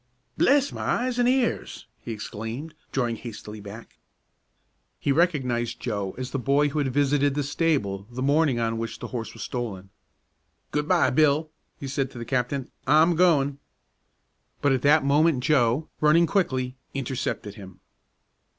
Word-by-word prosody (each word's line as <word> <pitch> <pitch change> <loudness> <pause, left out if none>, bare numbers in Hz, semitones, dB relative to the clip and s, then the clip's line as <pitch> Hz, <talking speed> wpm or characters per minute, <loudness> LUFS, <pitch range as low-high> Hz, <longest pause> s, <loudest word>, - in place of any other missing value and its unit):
"Bless 280 +1 +3
my - - -6
eyes 245 0 0
an' 245 - +3
ears!" 255 -2 0
he - - -7
exclaimed, 115 +7 -6 0.2
drawing 120 -4 -1
hastily 105 -2 -8
back. 105 +3 -11 1.0
He 140 - 0
recognized 135 -8 +1
Joe 100 -5 -3
as 130 +1 -5
the 140 - -2
boy 140 +3 +2
who 150 +2 -2
had 135 -3 0
visited 145 +1 +2
the 145 - 0
stable 135 - -1
the 125 +1 -4
morning 140 -2 +3
on 115 -1 -1
which 115 0 -4
the - - -7
horse 115 -3 -4
was 115 - -6
stolen. 105 -7 -5 0.8
"Good 150 0 -1
by, 180 0 +3
Bill!" 155 +2 +2 0.3
he 140 - -5
said 135 0 -1
to 130 - -12
the 115 - -5
captain. 130 +2 -2 0.2
"I'm 160 +4 +5
goin'!" 145 -5 +3 1.0
But 145 - +2
at 130 -2 +1
that 145 +1 +4
moment 145 -1 +3
Joe, 140 0 +2
running 155 +3 +5
quickly, 130 -9 0 0.2
intercepted 125 -6 -3
him. 95 -3 -12
135 Hz, 155 wpm, -25 LUFS, 120-150 Hz, 1.0 s, I'm